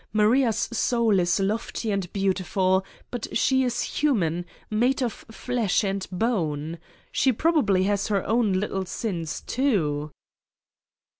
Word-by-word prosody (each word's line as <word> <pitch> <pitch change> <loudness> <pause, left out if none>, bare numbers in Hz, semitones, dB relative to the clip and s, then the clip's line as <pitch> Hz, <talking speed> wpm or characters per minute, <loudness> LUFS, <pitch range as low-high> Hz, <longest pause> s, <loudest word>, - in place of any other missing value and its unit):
Maria's 220 +2 +3
soul 230 -3 +1
is 175 +2 +2
lofty 215 +2 -1
and 195 -3 -2
beautiful, 190 -1 +1 0.3
but 245 -3 -4
she 265 +3 +3
is 245 -1 0
human, 175 - 0 0.2
made 245 +6 +2
of 235 - -1 0.2
flesh 225 -3 0
and 195 -1 -2
bone. 165 -7 -1 0.3
She 265 - +3
prob 325 +8 +1
ably 195 -7 +2
has 200 0 0
her 200 -2 0
own 225 -2 +2
little 190 0 -1
sins, 170 -7 -3
too. 160 - 0
205 Hz, 130 wpm, -25 LUFS, 185-235 Hz, 0.3 s, Maria's